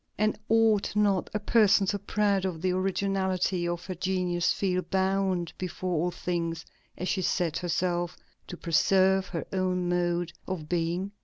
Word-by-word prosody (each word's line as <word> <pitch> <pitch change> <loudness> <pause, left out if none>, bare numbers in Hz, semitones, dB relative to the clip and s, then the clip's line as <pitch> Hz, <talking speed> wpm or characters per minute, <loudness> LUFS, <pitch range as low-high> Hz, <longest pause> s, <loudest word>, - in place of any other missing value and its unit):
and 215 0 +2
ought 220 -2 +3
not 200 -3 +2
a 210 - -1
person 210 -2 +4
so 200 +1 -1
proud 200 -1 +1
of 180 -4 -2
the 185 - +2
originality 185 -1 0
of 175 0 -3
her 185 - -4
genius 180 -1 0
feel 185 -2 0
bound 190 -2 0
before 185 0 -3
all 170 +2 +1
things, 170 -2 -3 0.3
as 180 - -3
she 190 - 0
said 175 -3 0
herself, 175 0 -1 0.3
"to 180 - -7
preserve 190 +3 +3
her 170 - -4
own 185 -1 0
mode 175 -1 0
of 175 -5 -4
being"? 175 +3 -1
185 Hz, 155 wpm, -28 LUFS, 175-195 Hz, 0.3 s, person